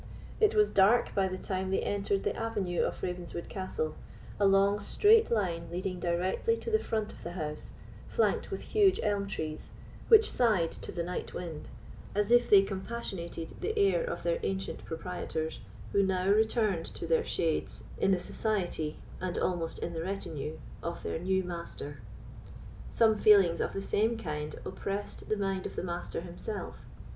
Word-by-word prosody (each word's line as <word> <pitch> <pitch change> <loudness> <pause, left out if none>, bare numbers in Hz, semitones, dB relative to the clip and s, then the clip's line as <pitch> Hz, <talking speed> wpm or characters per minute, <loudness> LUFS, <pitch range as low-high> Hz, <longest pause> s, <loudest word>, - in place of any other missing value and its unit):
It 440 0 +4
was 425 -1 +4
dark 200 +5 +4
by 195 -1 +2
the 185 0 -4
time 190 0 -3
they 190 - +1
entered 200 -1 0
the - - 0
avenue 200 -6 -1
of - - -2
Ravenswood 175 -1 -4
Castle, 185 -5 -3 0.5
a 200 - +5
long 195 +1 +4
straight 430 - +5
line 175 -7 0
leading 180 +1 -3
directly 180 - 0
to 460 - -5
the 435 - +4
front 220 - -2
of - - -14
the 170 - -6
house, 150 -4 -5 0.3
flanked 460 - +1
with - - -4
huge 405 -3 +3
elm 205 -2 0
trees, 155 -5 -4 0.4
which 445 -1 +8
sighed 210 -9 +2
to - - -6
the 170 - -2
night 180 +1 -5
wind, 165 -4 -6 0.5
as 205 +2 +1
if 240 0 +5
they 200 -1 +8
compassionated 190 -5 -5
the 440 +1 -2
heir 410 +4 +4
of - - -4
their - - +1
ancient 195 0 -3
proprietors, 160 -1 -4 0.3
who 200 - +4
now 190 -1 +1
returned 215 -4 +2
to - - -5
their 165 -1 +2
shades 165 -2 -1 0.2
in - - +3
the 190 -2 +3
society, 175 -6 -2 0.2
and 185 -1 -3
almost 170 -3 -1
in 170 - -4
the 165 - -3
retinue, 165 -5 -4 0.2
of 170 - -5
their - - -2
new 190 +2 +1
master. 170 -5 -6 0.9
Some 220 -2 +3
feelings 195 -5 +6
of - - -1
the 195 - -3
same 225 +4 +1
kind 150 -6 -4
oppressed 200 +1 -4
the 215 - +1
mind 195 -2 -1
of - - -10
the - - -3
Master 175 -2 -4
himself. 180 +4 -6
190 Hz, 170 wpm, -31 LUFS, 170-215 Hz, 0.9 s, which